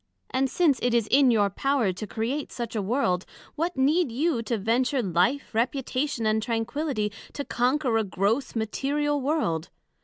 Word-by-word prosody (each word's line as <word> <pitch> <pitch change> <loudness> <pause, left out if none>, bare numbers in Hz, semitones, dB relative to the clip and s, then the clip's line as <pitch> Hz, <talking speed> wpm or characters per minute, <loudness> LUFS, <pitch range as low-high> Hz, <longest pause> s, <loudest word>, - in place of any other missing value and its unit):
And 265 +1 +1
since 295 -7 +2
it 245 -1 +1
is 230 -3 +3
in 270 0 +6
your 205 -4 +3
power 265 -4 +1
to 210 +4 -6
create 250 +8 -3
such 235 -2 -5
a 215 - 0
World, 195 -4 0 0.3
What 330 +1 -2
need 285 +2 +2
you 280 +1 0
to 230 +1 -2
venture 245 +5 +1
life, 185 +11 +1
reputation 255 +1 -1
and 215 0 +2
tranquility, 230 0 -1 0.2
to 285 - -4
conquer 250 0 +1
a - - +1
gross 205 +8 -1
material 285 +6 -1
World? 255 - -1
245 Hz, 160 wpm, -26 LUFS, 220-280 Hz, 0.3 s, in